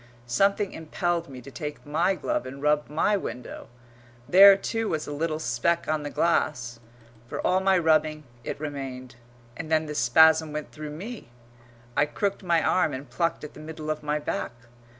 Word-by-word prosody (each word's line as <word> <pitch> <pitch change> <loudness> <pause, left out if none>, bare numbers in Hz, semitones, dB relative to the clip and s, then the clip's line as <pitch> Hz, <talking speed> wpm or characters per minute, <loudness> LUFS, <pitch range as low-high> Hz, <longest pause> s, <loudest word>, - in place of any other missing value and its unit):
Something 195 - +1
impelled 170 +1 -2
me 130 -2 -9
to 140 - -11
take 150 +1 -7
my 170 +6 +1
glove 130 - -2
and 135 +2 -8
rub 150 +1 +1
my 165 +7 +2
window. 125 -10 -6 0.6
There, 195 +2 +9
too, 225 +2 -2
was 155 -1 -2
a - - -6
little 155 +1 -2
speck 160 +5 0
on 155 -1 0
the 145 - -4
glass. 130 -8 0 0.5
For - - -5
all 185 - +3
my 190 0 +3
rubbing 155 -2 +2 0.2
it - - -5
remained. 135 -4 -6 0.4
And 160 +2 -7
then 155 0 +3
the 150 - -5
spasm 160 +5 +5
went 150 0 -5
through 155 -1 -7
me; 195 - -8 0.7
I 145 - +3
crooked 200 +6 -2
my 170 -3 +2
arm 160 -5 +2
and 135 +2 -9
plucked 170 -2 -1
at 150 - -8
the - - -12
middle 155 0 -5
of 155 - -4
my 150 0 -1
back. 145 -5 -3
155 Hz, 180 wpm, -26 LUFS, 145-170 Hz, 0.7 s, There